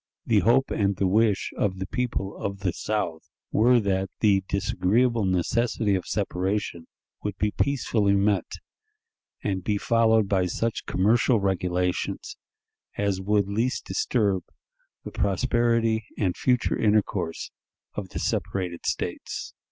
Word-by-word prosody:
The - - +4
hope 120 +4 +3
and 100 -1 +1
the 95 - 0
wish 105 +1 +2
of 95 -2 0
the 95 - -3
people 110 -3 -2
of 100 0 -5
the 90 -4 0
South 95 -4 -3 0.2
were 120 +3 +5
that 95 -2 0
the 100 -3 +3
disagreeable 110 +4 +1
necessity 105 +4 +1
of 95 -2 -1
separation 95 -3 -2 0.3
would 105 -2 -4
be 105 0 0
peacefully 110 -8 +1
met, 100 -1 +1 0.9
and 95 -3 -1
be 105 +2 0
followed 110 -1 +3
by 95 -2 +1
such 115 +5 -2
commercial 115 +5 +3
regulations 90 -2 -1 0.6
as 100 -2 0
would 100 0 +1
least 115 +6 -1
disturb 100 -7 0 0.6
the - - -7
prosperity 115 +1 +1
and 95 -4 0
future 125 -2 +1
intercourse 105 -6 0 0.4
of 100 -3 -5
the - - -7
separated 90 -3 -2
States. - - -3
100 Hz, 130 wpm, -26 LUFS, 95-115 Hz, 0.9 s, were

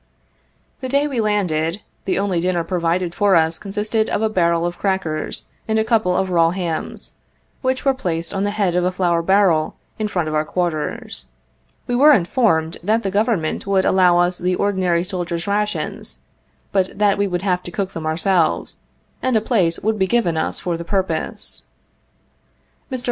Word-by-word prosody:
The 260 - -5
day 280 +2 +2
we 260 -5 -1
landed, 185 -4 0 0.2
the 190 - 0
only 195 -3 0
dinner 175 -1 0
provided 170 0 -1
for 200 0 +3
us 160 0 +2
consisted 215 +2 -1
of 215 - 0
a 220 - +2
barrel 170 -3 +2
of 175 0 -4
crackers 190 -6 -2 0.2
and 220 0 +1
a 220 - +3
couple 220 -6 +2
of 190 -1 0
raw 165 -2 +4
hams, 170 -3 -4 0.5
which 260 0 -1
were 270 - +4
placed 170 -9 -3
on 195 - -1
the 205 - +1
head 195 -4 +2
of 180 - +2
a 180 - +1
flour 175 -2 +1
barrel, 180 -3 +3 0.2
in 215 - 0
front 175 -6 -1
of 155 - -3
our 155 0 +2
quarters. 155 - -2 0.6
We - - -3
were 295 +4 +7
informed 170 - +1
that 220 +6 +1
the 195 - -1
Govern 210 -1 +2
ment 155 +5 -3
would 195 -1 +2
allow 180 -2 +4
us 175 +1 +1
the 180 +1 0
ordinary 185 -3 +1
soldiers' 175 -2 -3
rations, 210 +1 -2 0.5
but 190 -2 0
that 205 -1 +2
we 200 - +2
would 180 -1 -2
have 180 -2 +1
to 175 - -8
cook 190 +1 -2
them 160 -1 -4
ourselves, 170 +1 +1 0.4
and 255 -2 +1
a - - +5
place 200 -7 +1
would 215 0 0
be 190 - +2
given 220 -7 +1
us 160 - -1
for 175 -2 -2
the 170 - -6
purpose. 190 +2 -2 1.3
Mr. 260 - -2
185 Hz, 185 wpm, -20 LUFS, 170-210 Hz, 1.3 s, were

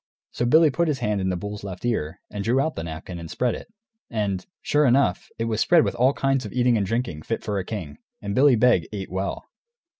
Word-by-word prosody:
So 120 - -1
Billy 155 +3 +6
put 170 +6 +1
his 150 -3 0
hand 105 -5 -1
in 95 - 0
the 90 - 0
bull's 105 +3 -6
left 95 +1 -6
ear, 90 -9 -2
and 105 -1 -4
drew 120 +5 +2
out 155 +3 0
the - - -4
napkin, 85 +2 -7
and 85 -1 -8
spread 125 +5 0
it; - - -8 0.4
and, 100 -5 -1 0.2
sure 150 -1 +3
enough, 125 -7 +2
it 115 - -1
was 110 -1 -1
spread 170 -2 +5
with - - -1
all 130 +3 +3
kinds 135 -1 +1
of 105 - -7
eating 125 -1 +3
and 100 -3 0
drinking, 115 -8 -2
fit 115 - -3
for 100 -2 -1
a - - -2
king. 90 -8 -6 0.2
And 100 0 -4
Billy 135 +2 +5
Beg 110 -7 +3
ate 100 -3 -6
well. 95 +1 -3
110 Hz, 240 wpm, -24 LUFS, 95-125 Hz, 0.4 s, Billy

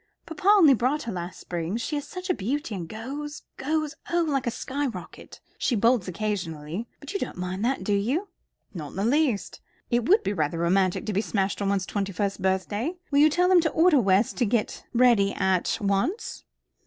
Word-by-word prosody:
Papa 370 +3 -6
only 385 -9 +7
bought 260 +5 0
her 235 - -4
last 175 -1 -6
spring. 175 +3 -3
She 275 +6 -3
is 290 0 -4
such 365 0 -7
a 365 - +2
beauty, 275 - -3
and 175 -4 -5
goes 285 +7 -6
goes 305 +2 -1 0.2
oh, 340 -1 +2
like 275 -4 0
a - - +4
skyrocket. 260 -6 -5 0.2
She 250 - +1
bolts 230 -2 +3
occasionally; 185 -1 -3
but 285 +6 -8
you 395 - -1
don't - - -4
mind 180 +2 -3
that, 260 -5 0
do 205 - 0
you?" 260 - 0 0.4
"Not 160 -6 -6
in - - -12
the 195 +2 -1
least. 250 - +1 0.3
It 240 0 +1
would 415 +4 +5
be 200 - -1
rather 155 -3 -1
romantic 185 +3 +1
to 215 - -2
be 200 - +2
smashed 200 -2 -1
on 200 - +1
one's 195 -2 0
twenty 200 -1 -2
first 200 +2 -2
birthday. 205 - -1 0.2
Will 280 - +4
you 305 +1 +7
tell 355 +4 +2
them 365 -2 +6
to 320 - +1
order 325 -4 +4
West 195 +1 +2
to 245 - +2
get 220 0 -1
ready 235 -5 +4
at 190 -2 +1
once." 205 - -1
225 Hz, 205 wpm, -26 LUFS, 190-295 Hz, 0.4 s, only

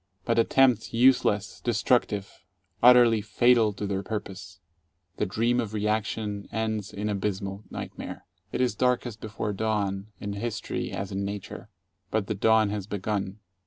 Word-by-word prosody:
But 115 0 +2
attempts 120 -1 +3
useless, 115 -4 +3
destructive, 100 -3 0 0.4
utterly 120 -2 +7
fatal 120 0 +3
to 100 +1 -5
their 100 -1 -1
purpose. 100 -3 -6 0.6
The - - 0
Dream 115 +5 +1
of 110 -3 -3
Reaction 105 -1 -2
ends 110 -2 -2
in 105 +1 -4
abysmal 100 0 -3
nightmare. - - -7 0.3
It - - -1
is 125 -4 +2
darkest 120 -1 0
before 105 -1 -3
dawn, 100 -2 -1
in 100 -1 -4
history 110 +2 -3
as 100 0 -4
in 100 0 -2
nature. 100 +1 -6 0.4
But 110 -2 0
the 110 - -2
dawn 110 +1 +3
has 105 -2 -4
begun. 100 0 -3
105 Hz, 140 wpm, -27 LUFS, 100-110 Hz, 0.6 s, utterly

